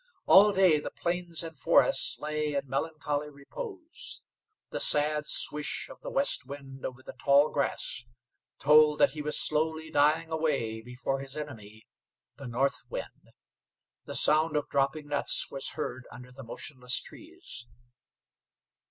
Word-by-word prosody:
All 205 +2 +7
day 185 -6 +4
the - - -5
plains 175 -1 -2
and 165 -1 -7
forests - - +3
lay 150 -1 -2
in 140 0 -2
melancholy 150 +1 -2
repose. 335 - -8 0.5
The - - -3
sad 150 0 +3
swish 150 0 0
of - - -13
the - - -6
west 275 +1 +1
wind 135 0 -10
over 130 0 -11
the - - -9
tall 140 +1 +4
grass 135 -3 -2 0.5
told 150 +1 +5
that - - +4
he 150 +1 -6
was 150 0 0
slowly 160 +1 0
dying 155 +3 +3
away 140 -9 -1
before 125 +3 -4
his 135 +2 -7
enemy, 110 -8 -8 0.5
the 140 - -8
north 130 +4 0
wind. - - -7 0.8
The - - -6
sound 155 0 +3
of 150 - -2
dropping 140 +2 0
nuts 145 -1 +2
was 135 -1 0
heard 125 +1 -5
under 125 +1 -12
the 135 +2 -11
motionless 125 +1 -2
trees. 335 - -11
150 Hz, 145 wpm, -29 LUFS, 135-160 Hz, 0.8 s, All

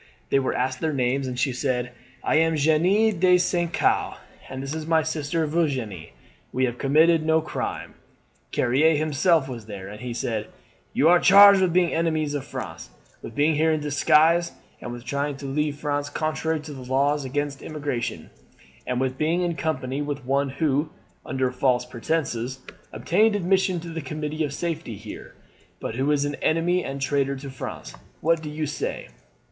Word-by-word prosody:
They 140 - +4
were 130 - -1
asked 130 +1 -1
their 160 -2 -1
names, 130 +1 0
and 125 -1 -4
she 130 +1 +1
said: 125 -1 -1 0.3
"'I - - +1
am 165 0 +3
Jeanne 175 +7 +3
de 180 0 +5
St. 175 -1 0
Caux, - - +1 0.3
and 130 0 -6
this 135 +2 -4
is 160 0 -5
my 160 -1 +3
sister 160 +1 -1
Virginie. 130 - -2 0.4
We 130 +1 +1
have 120 -1 -4
committed 155 +4 +4
no 160 0 +3
crime.' 155 - -5 0.6
"Carrier 150 +6 +3
himself 155 0 +2
was 120 -5 -8
there, 100 -2 -7
and 105 +1 -10
he 125 -1 -5
said: 110 -3 -2 0.5
"'You 150 - +3
are 175 0 +6
charged 200 +1 +8
with 185 -2 +2
being 175 -1 +2
enemies 160 -3 0
of 145 -3 -2
France, - - -7 0.3
with - - -9
being 150 +2 +3
here 160 +2 +2
in 155 - +1
disguise, 155 +3 +3 0.3
and 120 - -6
with 120 0 -8
trying 140 +2 -2
to 140 - -9
leave 145 +2 -1
France 145 -1 -2
contrary 155 +1 -1
to 150 0 -9
the 135 - -9
laws 140 +3 +1
against 140 +1 -3
emigration, 140 - -4 0.6
and 125 -1 -1
with 130 0 -2
being 165 +4 +1
in 170 -1 -1
company 140 -4 -2
with 145 -3 -4
one 140 +1 +1
who, 145 +1 0 0.4
under 130 -1 0
false 125 -1 +1
pretenses, 130 -1 -3 0.3
obtained 200 - +2
admission 190 -1 +1
to 170 +1 -8
the 165 0 -5
Committee 155 +2 -3
of 145 - -2
Safety 160 -5 -4
here, 105 +2 -10 0.4
but - - -4
who 135 +4 0
is 145 -1 +2
an 145 - -2
enemy 175 +3 +1
and 135 0 -5
traitor 140 0 0
to 135 0 -8
France. 130 - -7 0.3
What 165 0 +2
do 155 - -6
you 155 +1 -3
say?' 145 0 -4
145 Hz, 180 wpm, -24 LUFS, 130-160 Hz, 0.6 s, charged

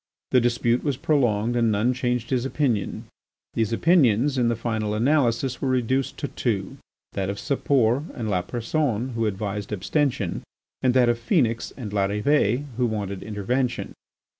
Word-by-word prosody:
The 125 - +5
dispute 120 0 +1
was 140 -4 -1
prolonged 120 -6 +1
and 115 -2 +2
none 110 +5 +2
changed 125 -1 -2
his 125 -2 +1
opinion. 135 -6 -1 0.5
These 115 -1 0
opinions, 135 - +3
in 125 -2 +2
the 120 - +1
final 110 -2 -2
analysis, 125 0 +1
were 135 - 0
reduced 130 +1 0
to 145 - -3
two: 100 -6 -2 0.4
that 95 -1 -2
of 100 - -3
Sapor 135 -1 +1
and 115 -3 -4
Lapersonne 120 - -1
who 115 -3 -1
advised 105 0 -3
abstention, 115 - -1 0.4
and 130 -1 +2
that 125 -2 +5
of 120 0 +1
Phœnix 115 - +1
and 115 -6 -6
Larrivée, 105 +6 +1
who 125 -1 +2
wanted 100 -3 -3
intervention. 120 +4 -2
120 Hz, 150 wpm, -24 LUFS, 105-130 Hz, 0.5 s, The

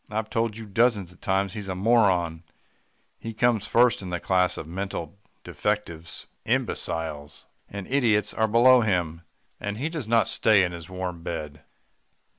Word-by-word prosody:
'I've 110 +1 -3
told 115 -1 -1
you 115 - -7
dozens 105 -3 +1
of 90 - -21
times 95 0 0
he's 105 -2 -6
a 95 - -3
moron. 95 -6 +2 0.8
He 115 -1 -7
comes 115 -2 +2
first 120 -1 +4
in 95 - -6
the 90 -1 -2
class 90 -1 +1
of - - -5
mental 90 0 -5 0.2
defectives. 90 -6 -3 0.2
Imbeciles 75 -3 -3 0.2
and 100 -1 -6
idiots 115 -5 +2
are 110 - +1
below 120 +3 +6
him 90 -6 -1 0.4
and 100 +1 -4
he 145 +7 -2
does 155 -8 -5
not 115 0 +3
stay 110 -3 +4
in 90 - 0
his 85 -1 -9
warm 90 -2 -5
bed. 75 -3 -6
100 Hz, 160 wpm, -25 LUFS, 90-110 Hz, 0.8 s, below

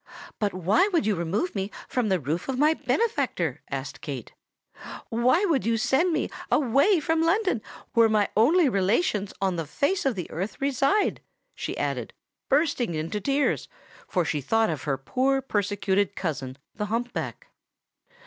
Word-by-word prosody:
"But 205 -2 +1
why 195 - +3
would 345 -6 +1
you 215 - +2
remove 185 - -1
me 195 -1 -2 0.2
from 245 -4 0
the 190 -2 +2
roof 155 - -3
of 265 - -1
my 300 +3 +4
benefactor?" 460 +7 -1
asked - - -5
Kate: - - -6 0.8
"why 255 - +3
would 315 -9 +1
you 230 +1 +1
send 290 +10 +2
me - - 0 0.2
away 285 - +4
from 320 +1 +1
London, 370 - +2 0.3
where 230 -1 +5
my 210 -2 +3
only 310 +10 +5
relations 205 - +1
on 190 -2 0
the 165 -2 -3
face 300 - 0
of 270 -5 +1
the 180 -3 -4
earth 190 +6 -4
reside?" 275 - +1 0.3
she - - -5
added, - - -2 0.4
bursting 275 - +1
into 165 +7 -3
tears; 280 +5 +1 0.4
for 180 -4 0
she 150 -2 -1
thought 225 - +2
of 155 -2 -5
her 135 -3 0
poor 260 - +1
persecuted 205 -5 0
cousin 135 -7 -4 0.2
the 210 0 -3
hump 235 +3 -2
back. - - -5
225 Hz, 160 wpm, -26 LUFS, 190-285 Hz, 0.8 s, where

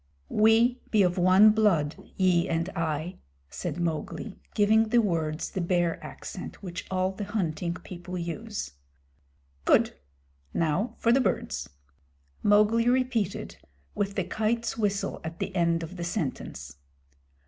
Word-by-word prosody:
"We 225 +3 +4
be 210 -3 +4
of 180 0 +1
one 185 +4 +7
blood, 185 -9 +2 0.2
ye 180 -3 +3
and 165 +2 0
I," 165 0 -3 0.3
said 175 -1 -4
Mowgli, 170 +5 -3 0.2
giving 220 +2 +4
the 240 - +3
words 165 -7 -1
the 190 - -2
Bear 175 -1 0
accent - - -8
which 175 -2 -6
all 185 0 0
the 195 +2 -6
Hunting 175 -5 -2
People 180 0 -7
use. 200 - -4 0.9
"Good. - - +4 0.6
Now 170 +9 0
for 230 - +2
the 265 +3 +5
birds." - - -1 0.7
Mowgli 215 +3 +4
repeated, 245 -6 0 0.4
with 200 0 -2
the 190 - +1
Kite's 220 +5 -1
whistle 200 -2 -1
at 165 +1 -6
the 195 - -4
end 170 -1 +2
of 175 +3 -8
the 175 - -4
sentence. 130 - -4
185 Hz, 135 wpm, -27 LUFS, 170-215 Hz, 0.9 s, one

